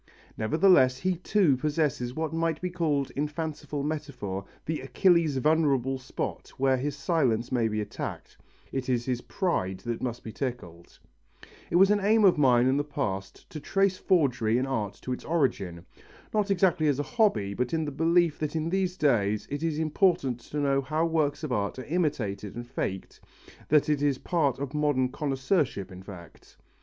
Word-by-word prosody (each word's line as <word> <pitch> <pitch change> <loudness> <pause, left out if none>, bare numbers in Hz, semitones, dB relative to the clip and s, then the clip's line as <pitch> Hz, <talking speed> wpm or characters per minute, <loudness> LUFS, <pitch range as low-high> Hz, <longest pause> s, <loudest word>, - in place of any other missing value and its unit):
Nevertheless 130 - +4
he 185 +5 0
too 185 -5 +3
possesses 145 -3 -1
what 160 -1 -2
might 165 -1 0
be 180 0 -3
called 150 -6 0
in 145 +2 -1
fanciful 150 -2 -4
metaphor 125 -11 -4 0.2
the 160 0 -2
Achilles' 165 0 +2
vulnerable 135 -3 +2
spot 130 - -5
where 135 0 +2
his 140 +2 -2
silence 135 -7 0
may 120 -3 +2
be 110 -1 -2
attacked: 105 - -6 0.4
it 135 -1 -3
is 120 -2 0
his 125 -2 -1
pride 95 - -2
that 120 +2 -4
must 120 -1 -4
be 110 - -7
tickled. 100 -11 -6 0.7
It - - -2
was 195 +3 +6
an 210 - +3
aim 210 +2 +4
of 180 -5 +5
mine 125 -3 +5
in 130 +2 +3
the 145 - +1
past 100 -10 -4
to 155 - -6
trace 195 +4 +1
forgery 125 - +2
in 130 - 0
art 110 -7 -2
to 130 - -2
its - - -7
origin. 100 - -1 0.5
Not 210 -2 +1
exactly 180 -5 +2
as 145 -3 +2
a 145 - -1
hobby 145 - +1
but 125 +4 -2
in 160 -1 0
the 145 - -4
belief 165 +2 +2
that 155 0 -3
in 160 +1 -1
these 185 -1 0
days 105 -7 +1
it 145 +1 -3
is 165 -2 -1
important 155 - +1
to 130 +5 -8
know 140 -1 +2
how 155 +4 0
works 155 -2 0
of 150 - -3
art 100 -2 -1
are 130 - -5
imitated 115 - -2
and 120 0 -6
faked, 100 -6 -5 0.5
that 150 -1 +4
it 150 -2 +1
is 145 -2 +2
part 145 -5 0
of 140 0 -5
modern 145 -4 +1
connoisseurship 135 - -1
in 90 0 -10
fact. 95 -4 -13
140 Hz, 180 wpm, -27 LUFS, 125-160 Hz, 0.7 s, was